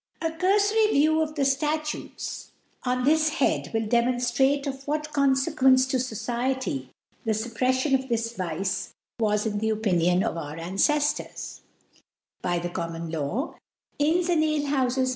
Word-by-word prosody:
A 325 Hz, -, -1 dB
curfory 410 Hz, +6 st, +3 dB
View 310 Hz, +2 st, +4 dB
of 310 Hz, -1 st, -2 dB
the 280 Hz, -3 st, +1 dB
Statutes 300 Hz, +3 st, -2 dB, 0.3 s
on 250 Hz, 0 st, 0 dB
this 310 Hz, +3 st, +4 dB
Head> 275 Hz, -, +1 dB
will 225 Hz, -1 st, 0 dB
demonftrate 245 Hz, +4 st, +2 dB
of 270 Hz, -1 st, -5 dB
whatConfeqoence 270 Hz, -3 st, +2 dB
to 260 Hz, -, +1 dB
Society 240 Hz, -, -2 dB, 0.3 s
the 225 Hz, -, +1 dB
Suppreffiou 255 Hz, +5 st, 0 dB
of 265 Hz, -, -13 dB
this 230 Hz, 0 st, -1 dB
Vice 185 Hz, +1 st, -3 dB, 0.3 s
was 210 Hz, -1 st, +1 dB
in 210 Hz, -2 st, -1 dB
the 220 Hz, +1 st, 0 dB
Opinion 180 Hz, -4 st, +2 dB
of 215 Hz, -, -2 dB
our 150 Hz, -2 st, -5 dB
Anceftors* 290 Hz, -, -1 dB, 0.8 s
By 175 Hz, -1 st, 0 dB
the 175 Hz, 0 st, -3 dB
Common 165 Hz, -1 st, -4 dB
Law, 165 Hz, -, -3 dB, 0.4 s
Inns 335 Hz, +4 st, +2 dB
and 335 Hz, -3 st, +3 dB
Afer 295 Hz, -2 st, 0 dB
houies. 255 Hz, +1 st, 0 dB
255 Hz, 140 wpm, -26 LUFS, 210-295 Hz, 0.8 s, View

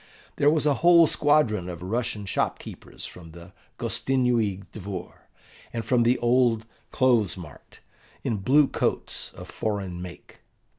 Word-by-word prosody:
There 145 Hz, -, +4 dB
was 155 Hz, 0 st, +2 dB
a 145 Hz, -, +4 dB
whole 170 Hz, 0 st, +7 dB
squadron 145 Hz, -, +2 dB
of 85 Hz, -1 st, -7 dB
Russian 105 Hz, +1 st, -2 dB
shop 95 Hz, -, -1 dB
keepers -, -, -10 dB
from 80 Hz, -3 st, -11 dB
the 85 Hz, +2 st, -13 dB, 0.2 s
Gostinnui 120 Hz, -7 st, 0 dB
Dvor, 100 Hz, -2 st, -6 dB, 0.6 s
and 115 Hz, -1 st, -4 dB
from 125 Hz, -2 st, +3 dB
the 120 Hz, +2 st, +3 dB
old 120 Hz, -2 st, +2 dB, 0.2 s
clothes 120 Hz, -8 st, +2 dB
mart, 80 Hz, -6 st, -13 dB, 0.4 s
in 110 Hz, -, -1 dB
blue 135 Hz, +9 st, +4 dB
coats -, -, -2 dB
of -, -, -10 dB
foreign 100 Hz, -5 st, -3 dB
make. 90 Hz, -3 st, -11 dB
115 Hz, 140 wpm, -26 LUFS, 95-130 Hz, 0.6 s, whole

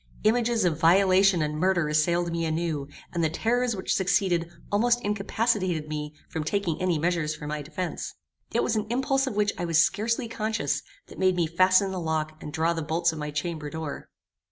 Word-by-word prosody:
Images 230 Hz, -1 st, +2 dB
of 165 Hz, -4 st, +1 dB
violation 185 Hz, 0 st, +5 dB
and 150 Hz, 0 st, -2 dB
murder 180 Hz, -3 st, +2 dB
assailed 170 Hz, +3 st, +1 dB
me 165 Hz, 0 st, -1 dB
anew, 160 Hz, -3 st, -1 dB, 0.3 s
and 170 Hz, -1 st, 0 dB
the 160 Hz, -, +2 dB
terrors 235 Hz, +7 st, 0 dB
which 190 Hz, -, -1 dB
succeeded 180 Hz, -3 st, +1 dB, 0.2 s
almost 240 Hz, +4 st, +3 dB
incapacitated 205 Hz, -5 st, 0 dB
me 150 Hz, 0 st, -4 dB
from 160 Hz, -, -4 dB
taking 180 Hz, -1 st, -1 dB
any 180 Hz, -3 st, +1 dB
measures 160 Hz, -1 st, 0 dB
for 150 Hz, -, -9 dB
my 150 Hz, 0 st, -3 dB
defence. 165 Hz, +5 st, -5 dB, 0.4 s
It -, -, +1 dB
was 225 Hz, -, 0 dB
an 215 Hz, -1 st, -1 dB
impulse 270 Hz, +2 st, +1 dB
of 245 Hz, -, -3 dB
which 205 Hz, -1 st, +1 dB
I 175 Hz, -, -1 dB
was 165 Hz, -2 st, +1 dB
scarcely 230 Hz, +5 st, -1 dB
conscious, 220 Hz, 0 st, -1 dB, 0.2 s
that -, -, -13 dB
made 185 Hz, -1 st, +3 dB
me 175 Hz, -2 st, +2 dB
fasten 185 Hz, +4 st, +3 dB
the 190 Hz, -, -3 dB
lock 155 Hz, -2 st, -2 dB
and 150 Hz, -, -7 dB
draw 160 Hz, +2 st, +1 dB
the 165 Hz, -, -3 dB
bolts 165 Hz, +2 st, +1 dB
of 160 Hz, -, -7 dB
my 150 Hz, 0 st, -3 dB
chamber 150 Hz, 0 st, -3 dB
door. 160 Hz, -1 st, -6 dB
175 Hz, 195 wpm, -26 LUFS, 160-205 Hz, 0.4 s, violation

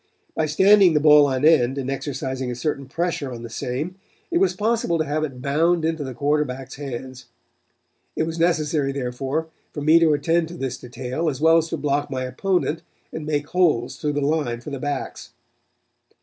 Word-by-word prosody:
By 160 Hz, -, 0 dB
standing 190 Hz, +2 st, +5 dB
the -, -, +5 dB
ball 150 Hz, -1 st, +7 dB
on 130 Hz, +1 st, 0 dB
end 135 Hz, -5 st, +4 dB
and 135 Hz, -1 st, -3 dB
exercising 130 Hz, -2 st, -4 dB
a 125 Hz, -, -3 dB
certain 140 Hz, +1 st, -3 dB
pressure 160 Hz, -2 st, -2 dB
on 120 Hz, -1 st, -7 dB
the 115 Hz, -, -8 dB
same 135 Hz, +10 st, -4 dB, 0.3 s
it 345 Hz, -, +2 dB
was 385 Hz, 0 st, +2 dB
possible 215 Hz, -5 st, 0 dB
to 155 Hz, -, 0 dB
have 155 Hz, +1 st, -1 dB
it 130 Hz, -4 st, -5 dB
bound 160 Hz, +4 st, +2 dB
into 160 Hz, -2 st, -1 dB
the 130 Hz, -3 st, -6 dB
quarterback's 140 Hz, -2 st, -1 dB
hands. 130 Hz, -2 st, -7 dB, 0.9 s
It -, -, 0 dB
was 165 Hz, +1 st, -4 dB
necessary, 155 Hz, -4 st, +1 dB
therefore, 135 Hz, +4 st, -3 dB, 0.2 s
for 145 Hz, -, -6 dB
me 155 Hz, +3 st, +5 dB
to 165 Hz, -2 st, +4 dB
attend 165 Hz, +3 st, +1 dB
to 170 Hz, -, -9 dB
this 130 Hz, -3 st, -4 dB
detail 125 Hz, +6 st, -3 dB
as 135 Hz, -3 st, -5 dB
well 160 Hz, +2 st, +5 dB
as 165 Hz, 0 st, -3 dB
to 165 Hz, -, -2 dB
block 145 Hz, 0 st, -1 dB
my 130 Hz, -1 st, -3 dB
opponent 165 Hz, +5 st, -1 dB, 0.3 s
and 155 Hz, -1 st, -5 dB
make 145 Hz, -1 st, -1 dB
holes 160 Hz, -10 st, +1 dB
through 150 Hz, -1 st, -2 dB
the 145 Hz, -, -1 dB
line 140 Hz, -5 st, 0 dB
for 145 Hz, -, -9 dB
the 140 Hz, -, -4 dB
backs. 145 Hz, +1 st, -5 dB
145 Hz, 190 wpm, -23 LUFS, 130-160 Hz, 0.9 s, ball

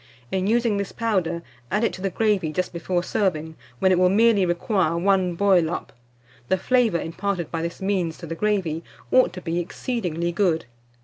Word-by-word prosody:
In 190 Hz, 0 st, 0 dB
using 230 Hz, -1 st, +2 dB
this 200 Hz, -1 st, -3 dB
powder, 185 Hz, -7 st, -1 dB, 0.3 s
add 210 Hz, +3 st, 0 dB
it -, -, +1 dB
to 185 Hz, -, -8 dB
the 195 Hz, -, 0 dB
gravy 200 Hz, -5 st, +1 dB
just 180 Hz, +3 st, -2 dB
before 175 Hz, +1 st, -1 dB
serving, 160 Hz, -5 st, -1 dB, 0.2 s
when 190 Hz, +8 st, +3 dB
it 180 Hz, -, +3 dB
will 180 Hz, 0 st, +5 dB
merely 210 Hz, -1 st, +4 dB
require 175 Hz, -1 st, +1 dB
one 185 Hz, -1 st, +2 dB
boil 185 Hz, -3 st, +3 dB
up. 175 Hz, -, -5 dB, 0.6 s
The 190 Hz, -, +3 dB
flavour 230 Hz, -3 st, +2 dB
imparted 180 Hz, +1 st, -3 dB
by 165 Hz, -, -2 dB
this 170 Hz, +3 st, -5 dB
means 185 Hz, -5 st, 0 dB
to 170 Hz, -, -8 dB
the 165 Hz, -, -5 dB
gravy, 175 Hz, -4 st, -1 dB, 0.3 s
ought 255 Hz, -6 st, +5 dB
to 180 Hz, -, -7 dB
be 170 Hz, 0 st, -2 dB
exceedingly 175 Hz, -3 st, -2 dB
good. 170 Hz, -3 st, +1 dB
185 Hz, 185 wpm, -24 LUFS, 170-200 Hz, 0.6 s, will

